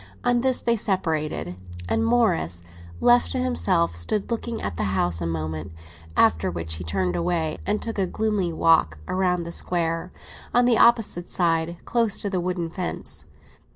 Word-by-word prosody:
On 245 Hz, 0 st, +2 dB
this 260 Hz, 0 st, +2 dB
they 235 Hz, 0 st, +3 dB
separated, 155 Hz, -, -1 dB, 0.3 s
and 225 Hz, -, +1 dB
Morris, 90 Hz, -, +1 dB, 0.4 s
left 120 Hz, -5 st, +4 dB
to -, -, -1 dB
himself, 85 Hz, 0 st, +1 dB
stood 140 Hz, -, -2 dB
looking 230 Hz, 0 st, -2 dB
at 100 Hz, -, -4 dB
the 95 Hz, +2 st, -1 dB
house 85 Hz, -1 st, +1 dB
a 85 Hz, -, -1 dB
moment; 80 Hz, -1 st, -4 dB, 0.5 s
after 80 Hz, +2 st, +4 dB
which 80 Hz, -2 st, -4 dB
he 90 Hz, -, -6 dB
turned 90 Hz, +1 st, -1 dB
away, 160 Hz, -, -1 dB
and 210 Hz, +1 st, +1 dB
took 225 Hz, -3 st, -4 dB
a 190 Hz, -, +1 dB
gloomy 210 Hz, -4 st, 0 dB
walk 160 Hz, -, +3 dB
round 180 Hz, -2 st, 0 dB
the 170 Hz, -, -6 dB
Square, 170 Hz, 0 st, -2 dB, 0.4 s
on 245 Hz, 0 st, +5 dB
the 245 Hz, -1 st, +4 dB
opposite 225 Hz, -7 st, +3 dB
side, 170 Hz, -1 st, +1 dB
close 230 Hz, -4 st, +1 dB
to 200 Hz, -, -3 dB
the 185 Hz, -2 st, 0 dB
wooden 175 Hz, -2 st, -2 dB
fence. 180 Hz, 0 st, -6 dB
165 Hz, 165 wpm, -24 LUFS, -, 0.5 s, on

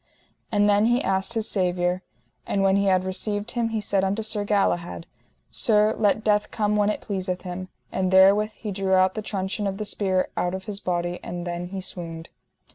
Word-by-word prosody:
And 205 Hz, -1 st, +3 dB
then 205 Hz, +1 st, +4 dB
he 240 Hz, +2 st, +2 dB
asked 190 Hz, +3 st, 0 dB
his 225 Hz, -1 st, -1 dB
Saviour. 180 Hz, -2 st, 0 dB, 0.5 s
And 195 Hz, -, +1 dB
when 195 Hz, 0 st, +4 dB
he 200 Hz, 0 st, +2 dB
had 185 Hz, -1 st, +3 dB
received 205 Hz, +4 st, -2 dB
Him 235 Hz, -2 st, 0 dB
he 225 Hz, -1 st, -1 dB
said 195 Hz, -2 st, 0 dB
unto 200 Hz, +3 st, 0 dB
Sir 215 Hz, -1 st, -1 dB
Galahad: 195 Hz, -5 st, 0 dB, 0.5 s
Sir, 215 Hz, -1 st, +3 dB
let 215 Hz, 0 st, +2 dB
death 210 Hz, -1 st, +2 dB
come 210 Hz, -1 st, 0 dB
when 205 Hz, 0 st, +3 dB
it 210 Hz, -, -2 dB
pleaseth 185 Hz, -2 st, -3 dB
him. 185 Hz, 0 st, -6 dB, 0.2 s
And 185 Hz, -1 st, 0 dB
therewith 200 Hz, +3 st, +5 dB
he 215 Hz, -1 st, -6 dB
drew 190 Hz, -1 st, +1 dB
out 185 Hz, 0 st, +4 dB
the 215 Hz, -, -4 dB
truncheon 200 Hz, 0 st, -2 dB
of 195 Hz, 0 st, -3 dB
the 215 Hz, -, -4 dB
spear 190 Hz, -3 st, 0 dB
out 180 Hz, +1 st, -1 dB
of 190 Hz, -, -6 dB
his 205 Hz, -1 st, -5 dB
body: 175 Hz, -2 st, -2 dB
and 175 Hz, 0 st, -6 dB
then 175 Hz, 0 st, -4 dB
he 190 Hz, +1 st, -5 dB
swooned. 165 Hz, -3 st, -5 dB
195 Hz, 200 wpm, -25 LUFS, 185-210 Hz, 0.5 s, therewith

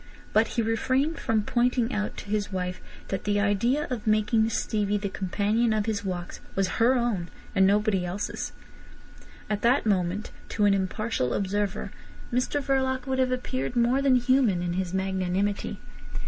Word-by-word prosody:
But 220 Hz, +1 st, +4 dB
he 230 Hz, -, +3 dB
refrained 260 Hz, +8 st, 0 dB
from 220 Hz, -2 st, +1 dB
pointing 245 Hz, +1 st, +1 dB
out 210 Hz, 0 st, -2 dB
to -, -, -7 dB
his 210 Hz, -1 st, -1 dB
wife 180 Hz, -1 st, -3 dB, 0.3 s
that 195 Hz, -, -2 dB
the 205 Hz, 0 st, +2 dB
idea 220 Hz, +8 st, +2 dB
of 230 Hz, -3 st, -4 dB
making 215 Hz, +1 st, +3 dB
Stevie 210 Hz, -1 st, 0 dB
the 200 Hz, -1 st, -3 dB
companion 210 Hz, +5 st, 0 dB
of 215 Hz, -1 st, 0 dB
his 215 Hz, -2 st, -1 dB
walks 180 Hz, -2 st, -4 dB, 0.2 s
was 195 Hz, -1 st, +2 dB
her 245 Hz, +3 st, +5 dB
own, 230 Hz, -8 st, 0 dB, 0.2 s
and 190 Hz, -1 st, +5 dB
nobody 205 Hz, -2 st, +2 dB
else's. 180 Hz, +3 st, -3 dB, 1.0 s
At 210 Hz, -1 st, -2 dB
that 245 Hz, +4 st, +3 dB
moment, 195 Hz, 0 st, 0 dB, 0.2 s
to 210 Hz, -, +1 dB
an 200 Hz, -, +5 dB
impartial 190 Hz, -, -1 dB
observer, 205 Hz, 0 st, -1 dB, 0.4 s
Mr 255 Hz, +3 st, 0 dB
Verloc 260 Hz, -1 st, 0 dB
would 265 Hz, -1 st, -1 dB
have 255 Hz, -1 st, +2 dB
appeared 255 Hz, 0 st, -2 dB
more 240 Hz, +3 st, +3 dB
than 275 Hz, -2 st, +4 dB
human 245 Hz, -7 st, +3 dB
in 175 Hz, -1 st, -1 dB
his 185 Hz, -1 st, -2 dB
magnanimity. 190 Hz, +1 st, -1 dB
210 Hz, 160 wpm, -27 LUFS, 195-240 Hz, 1.0 s, her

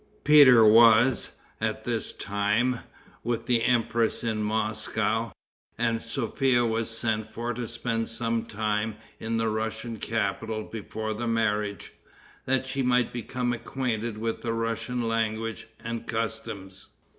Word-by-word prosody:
Peter 135 Hz, -6 st, +8 dB
was, 115 Hz, +2 st, +5 dB, 0.2 s
at -, -, -1 dB
this -, -, -2 dB
time, 105 Hz, +5 st, 0 dB, 0.4 s
with 115 Hz, 0 st, -2 dB
the 120 Hz, -2 st, +2 dB
empress 115 Hz, -2 st, +1 dB
in 110 Hz, -2 st, -1 dB
Moscow, 110 Hz, +1 st, -1 dB, 0.5 s
and 115 Hz, -1 st, 0 dB
Sophia 120 Hz, +1 st, +1 dB
was 115 Hz, 0 st, -1 dB
sent 110 Hz, -1 st, -1 dB
for 120 Hz, +2 st, -4 dB
to 120 Hz, 0 st, -4 dB
spend 115 Hz, -1 st, -2 dB
some 115 Hz, 0 st, -1 dB
time 105 Hz, 0 st, -1 dB, 0.2 s
in 115 Hz, 0 st, -2 dB
the 115 Hz, 0 st, +1 dB
Russian 110 Hz, +1 st, -3 dB
capital 110 Hz, +1 st, -2 dB
before 110 Hz, 0 st, -5 dB
the 120 Hz, +2 st, -3 dB
marriage, 105 Hz, -3 st, -1 dB, 0.5 s
that 130 Hz, 0 st, +1 dB
she 135 Hz, +1 st, -2 dB
might 125 Hz, -1 st, +2 dB
become 120 Hz, +1 st, -2 dB
acquainted 120 Hz, -2 st, -3 dB
with 115 Hz, +1 st, -3 dB
the 115 Hz, -1 st, -2 dB
Russian 115 Hz, +1 st, -2 dB
language 115 Hz, 0 st, -2 dB, 0.2 s
and 115 Hz, 0 st, -5 dB
customs. 105 Hz, -4 st, -4 dB
115 Hz, 130 wpm, -27 LUFS, 110-120 Hz, 0.5 s, Peter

